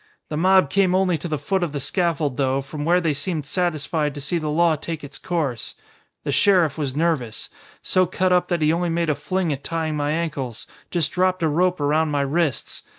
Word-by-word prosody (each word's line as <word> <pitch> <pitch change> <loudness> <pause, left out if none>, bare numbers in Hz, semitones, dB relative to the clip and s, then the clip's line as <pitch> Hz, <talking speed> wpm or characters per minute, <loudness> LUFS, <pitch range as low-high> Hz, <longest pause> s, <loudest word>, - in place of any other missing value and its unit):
The 150 - -3
mob 185 -2 +4
came 190 -2 +3
only 185 -2 +2
to 175 - -5
the 155 -2 -1
foot 190 +7 -1
of 170 -4 -2
the 145 - -2
scaffold 155 -4 0
though, 135 -1 +1
from 145 +2 -6
where 175 +2 +4
they 165 -4 0
seemed 150 +1 -3
satisfied 155 -3 -1
to - - -5
see 160 +5 -1
the 155 -1 -3
law 165 +1 +3
take 160 +1 -6
its 145 - -8
course. 150 -10 -2 0.5
The - - -2
sheriff 180 -7 +4
was 140 -4 -3
nervous. 150 -8 -1 0.3
So 185 -1 +2
cut 185 +1 +1
up 180 - +3
that 170 -3 0
he 155 +1 +4
only 175 +1 0
made 165 -1 +1
a - - +2
fling 160 +3 -1
at 140 0 -7
tying 160 -2 -2
my 145 -1 -1
ankles, 150 -7 -3 0.2
just 170 -4 0
dropped 185 -1 +1
a - - +4
rope 180 +4 +1
around 150 +2 +2
my 145 -1 0
wrists. 145 -2 -1
160 Hz, 215 wpm, -22 LUFS, 145-175 Hz, 0.5 s, mob